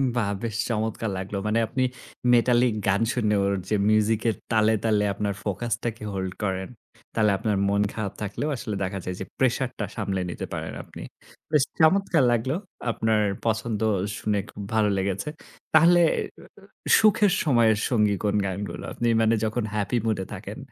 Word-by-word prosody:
বাহ! 110 Hz, -4 st, +1 dB
বেশ 110 Hz, -2 st, -3 dB
চমৎকার 110 Hz, -1 st, -1 dB
লাগলো। 95 Hz, +2 st, -4 dB
মানে 110 Hz, +2 st, +2 dB
আপনি 130 Hz, +3 st, -1 dB, 0.5 s
মেটালিক 120 Hz, 0 st, +4 dB
গান 100 Hz, +3 st, +2 dB
শুনে 105 Hz, -4 st, +1 dB
ওর 100 Hz, 0 st, +1 dB, 0.2 s
যে 105 Hz, -, +2 dB
মিউজিকের 110 Hz, 0 st, +2 dB, 0.2 s
তালে, 110 Hz, 0 st, +4 dB
তালে 105 Hz, -2 st, +3 dB
আপনার 100 Hz, 0 st, -2 dB
ফোকাসটাকে 115 Hz, +2 st, -3 dB
hold 95 Hz, -1 st, -3 dB
করেন, 95 Hz, -1 st, -2 dB, 0.4 s
তাহলে 105 Hz, -2 st, +3 dB
আপনার 105 Hz, -1 st, 0 dB
মন 100 Hz, 0 st, +2 dB
খারাপ 100 Hz, -3 st, -4 dB
থাকলেও 105 Hz, +9 st, -3 dB
আসলে 110 Hz, -3 st, -4 dB
দেখা 95 Hz, +1 st, -3 dB
যায় 90 Hz, 0 st, -3 dB
যে 95 Hz, -, -4 dB
প্রেশারটা 130 Hz, -3 st, 0 dB
সামলে 95 Hz, -1 st, -2 dB
নিতে -, -, -5 dB
পারেন -, -, -4 dB
আপনি। -, -, -11 dB, 0.5 s
বেশ 150 Hz, -4 st, +4 dB, 0.2 s
চমৎকার 165 Hz, -2 st, +4 dB
লাগলো 120 Hz, +5 st, 0 dB, 0.4 s
আপনার 110 Hz, -1 st, +1 dB, 0.3 s
পছন্দ 110 Hz, -1 st, -1 dB, 0.4 s
শুনে 105 Hz, -1 st, 0 dB
খুব 100 Hz, -, -9 dB
ভালো 110 Hz, -2 st, +3 dB
লেগেছে। 100 Hz, +7 st, -2 dB, 0.4 s
তাহলে 170 Hz, +2 st, +6 dB, 0.4 s
উ -, -, -14 dB, 0.2 s
উ -, -, -12 dB
সুখের 210 Hz, -2 st, +4 dB
সময়ের 115 Hz, -7 st, +4 dB
সঙ্গী 105 Hz, -4 st, +2 dB
কোন 105 Hz, 0 st, +1 dB
গানগুলো? 100 Hz, +2 st, -4 dB
আপনি 120 Hz, -, -1 dB
মানে 110 Hz, +1 st, +3 dB
যখন 110 Hz, +1 st, -1 dB
হ্যাপি 105 Hz, +3 st, 0 dB
মুডে 100 Hz, -4 st, 0 dB
থাকেন -, -, -7 dB
110 Hz, 160 wpm, -25 LUFS, 100-120 Hz, 0.5 s, তাহলে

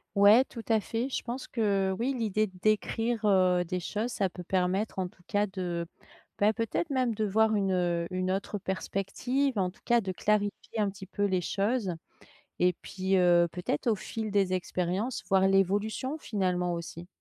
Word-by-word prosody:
Ouais 205 Hz, +5 st, +7 dB
tout 230 Hz, -4 st, -9 dB
à 220 Hz, -1 st, +4 dB
fait, 235 Hz, +5 st, -3 dB
je -, -, -2 dB
pense 250 Hz, +2 st, -5 dB
que 200 Hz, -4 st, +1 dB
oui, 260 Hz, +4 st, 0 dB
l'idée 215 Hz, -1 st, +1 dB
d'écrire, 215 Hz, +4 st, 0 dB
heu, 185 Hz, -3 st, +4 dB
des 180 Hz, +1 st, -3 dB
choses, 215 Hz, +7 st, -3 dB
ça 195 Hz, -4 st, 0 dB
peut 180 Hz, 0 st, -9 dB
permettre 190 Hz, +3 st, 0 dB
en 185 Hz, -, -1 dB
tout 180 Hz, -, -19 dB
cas 205 Hz, -1 st, +2 dB
de, 180 Hz, -4 st, -3 dB, 0.5 s
bah, 210 Hz, +2 st, +4 dB
peut-être 230 Hz, +9 st, -2 dB
même 255 Hz, -4 st, +1 dB
de 215 Hz, 0 st, -2 dB
voir 220 Hz, +2 st, +3 dB
une, 195 Hz, -2 st, +1 dB
heu, 175 Hz, -2 st, 0 dB
une 185 Hz, 0 st, -1 dB
autre 200 Hz, +2 st, -2 dB
perspective, 205 Hz, +7 st, -1 dB
en 185 Hz, -1 st, +1 dB
tout 180 Hz, -, -18 dB
cas, 240 Hz, -1 st, +4 dB
de 190 Hz, -3 st, -3 dB
clarifier 210 Hz, +3 st, -1 dB
un 205 Hz, -, +2 dB
petit 195 Hz, 0 st, -9 dB
peu 205 Hz, +1 st, -1 dB
les 185 Hz, -2 st, +1 dB
choses. 200 Hz, +1 st, 0 dB, 0.7 s
Et 180 Hz, 0 st, +4 dB
puis, 190 Hz, 0 st, -1 dB
heu, 175 Hz, -1 st, +5 dB
peut-être 180 Hz, +2 st, -2 dB
au 220 Hz, -, +3 dB
fil 220 Hz, +2 st, -5 dB
des 195 Hz, -2 st, +2 dB
expériences, 185 Hz, +5 st, -2 dB
voir 190 Hz, -1 st, +4 dB
l'évolution, 205 Hz, -, +1 dB
finalement, 180 Hz, -7 st, -1 dB
aussi. 170 Hz, 0 st, -7 dB
195 Hz, 180 wpm, -29 LUFS, 185-220 Hz, 0.7 s, Ouais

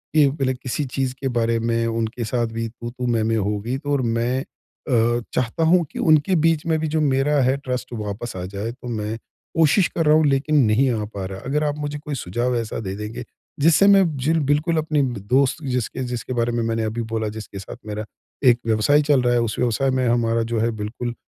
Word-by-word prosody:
कि 150 Hz, -2 st, +6 dB
पहले 135 Hz, -3 st, -1 dB
किसी 130 Hz, +3 st, -3 dB
चीज़ 130 Hz, 0 st, -2 dB
के 135 Hz, -, 0 dB
बारे 115 Hz, 0 st, +2 dB
में 115 Hz, 0 st, 0 dB
उनके 115 Hz, +1 st, -2 dB
साथ 120 Hz, +1 st, 0 dB
भी 115 Hz, 0 st, -4 dB
तू-तू 120 Hz, +2 st, -6 dB
मैं-मैं 115 Hz, 0 st, +1 dB
हो 105 Hz, 0 st, 0 dB
गई 120 Hz, +5 st, -2 dB
तो 145 Hz, +1 st, -5 dB
और 140 Hz, -, +2 dB, 0.2 s
मैं 125 Hz, +3 st, 0 dB
अ, 120 Hz, -3 st, -2 dB
चाहता 125 Hz, +6 st, 0 dB
हूँ 180 Hz, -1 st, +5 dB
कि -, -, -7 dB
उनके 155 Hz, +5 st, +4 dB
बीच 165 Hz, -2 st, +1 dB
में 160 Hz, -1 st, +2 dB
भी 160 Hz, -, -1 dB
जो 155 Hz, -, +2 dB
मेरा 140 Hz, +1 st, +2 dB
है 130 Hz, +2 st, +2 dB
ट्रस्ट 130 Hz, -2 st, -4 dB
वापस 105 Hz, +1 st, -5 dB
आ 90 Hz, -, -4 dB
जाए 105 Hz, +4 st, -3 dB
तो 130 Hz, -1 st, -11 dB
मैं 105 Hz, +2 st, -3 dB, 0.4 s
कोशिश 165 Hz, +4 st, +4 dB
कर 165 Hz, -, +1 dB
रहा 150 Hz, +1 st, +6 dB
हूँ 155 Hz, -, +4 dB
लेकिन 140 Hz, +2 st, +1 dB
नहीं 120 Hz, +6 st, +3 dB
आ 110 Hz, -3 st, -2 dB
पा 100 Hz, -2 st, -6 dB
रहा। 95 Hz, 0 st, -6 dB
अगर 150 Hz, +3 st, 0 dB
आप 145 Hz, -1 st, 0 dB
मुझे 145 Hz, 0 st, -3 dB
कोई 150 Hz, -1 st, -5 dB
सुझाव 120 Hz, +4 st, -1 dB
ऐसा 115 Hz, -1 st, -3 dB
दे 95 Hz, -, -3 dB
देंगे, 105 Hz, +3 st, -6 dB, 0.4 s
जिससे 165 Hz, +6 st, +5 dB
मैं 195 Hz, -1 st, +7 dB
जिल 160 Hz, +5 st, +1 dB
बिल्कुल 155 Hz, +3 st, +2 dB
अपनी 155 Hz, -2 st, +1 dB
ब 120 Hz, -5 st, -2 dB
दोस्त 135 Hz, +5 st, +2 dB
जिसके 125 Hz, -1 st, -2 dB
जिसके 125 Hz, 0 st, -4 dB
बारे 120 Hz, 0 st, 0 dB
में 120 Hz, -, 0 dB
मैंने 115 Hz, 0 st, -1 dB
अभी 110 Hz, +2 st, -2 dB
बोला 110 Hz, -1 st, -1 dB
जिसके 100 Hz, -2 st, -8 dB
साथ 95 Hz, -, -9 dB
मेरा 105 Hz, 0 st, -4 dB, 0.4 s
एक 120 Hz, 0 st, +4 dB
व्यवसाय 115 Hz, +7 st, +3 dB
चल 145 Hz, -3 st, +3 dB
रहा 120 Hz, 0 st, +2 dB
है, 120 Hz, -, +3 dB
उस 110 Hz, -2 st, -2 dB
व्यवसाय 125 Hz, +2 st, +1 dB
में 130 Hz, -1 st, +1 dB
हमारा 115 Hz, -1 st, +2 dB
जो 115 Hz, -, +1 dB
है 115 Hz, +1 st, +1 dB
बिल्कुल 120 Hz, +3 st, -4 dB
125 Hz, 225 wpm, -22 LUFS, 115-145 Hz, 0.4 s, मैं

